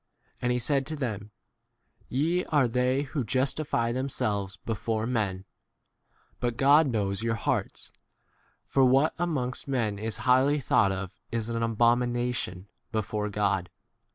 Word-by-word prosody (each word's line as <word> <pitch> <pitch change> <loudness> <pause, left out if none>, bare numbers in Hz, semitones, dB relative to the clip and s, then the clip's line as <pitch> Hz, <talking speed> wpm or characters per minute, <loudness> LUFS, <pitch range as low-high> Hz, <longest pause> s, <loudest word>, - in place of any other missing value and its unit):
And 125 - +1
he 125 - +1
said 135 +2 0
to 155 - -1
them, 110 -7 -4 0.8
Ye 165 +8 +1
are 145 -5 +3
they 125 +3 +1
who 140 -1 -3
justify 130 0 0
themselves 105 -6 -2
before 110 0 -1
men, 100 -6 -1 0.9
but 120 -1 -2
God 145 +3 +6
knows 100 -5 0
your 115 0 0
hearts; - - -2 0.7
for 135 - +2
what 135 +4 +4
a 175 - +1
mongst 125 -6 -2
men 115 -7 -1
is 110 +1 -3
highly 130 +3 +4
thought 100 -6 +3
of 95 -1 -4 0.2
is 115 -1 -2
an 115 0 -2
abomination 120 -3 0 0.2
before 105 -1 -2
God. 100 -3 0
120 Hz, 135 wpm, -28 LUFS, 105-135 Hz, 0.9 s, God